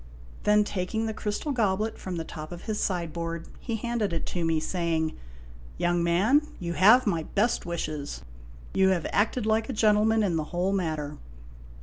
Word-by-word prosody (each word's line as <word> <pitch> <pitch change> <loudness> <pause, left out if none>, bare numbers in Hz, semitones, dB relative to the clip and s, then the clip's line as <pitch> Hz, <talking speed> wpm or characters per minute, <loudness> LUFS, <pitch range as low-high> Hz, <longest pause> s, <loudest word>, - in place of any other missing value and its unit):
Then 210 0 +5
taking 205 +3 -2
the 220 - -2
crystal 210 +7 -3
goblet 215 -3 0
from 185 -2 -5
the 165 - -3
top 155 0 -8
of 175 0 -8
his 215 -1 -2
sideboard, 170 -2 -2
he 230 - -3
handed 225 -3 -1
it 165 - -2
to 175 - -1
me, 165 -1 +2
saying: 160 -1 -1 0.3
" - - -18
Young 175 0 +1
man, 195 - +4 0.2
you 170 -1 -3
have 220 +9 +6
my 170 -6 +1
best 205 +5 0
wishes. 150 - -4 0.5
You 190 0 +4
have 180 -4 +1
acted 215 +3 +1
like 220 +1 +1
a - - -1
gentleman 215 0 +3
in 175 -5 +1
the 155 - -1
whole 180 +4 -1
matter. 155 -6 -2
185 Hz, 180 wpm, -27 LUFS, 165-215 Hz, 0.5 s, have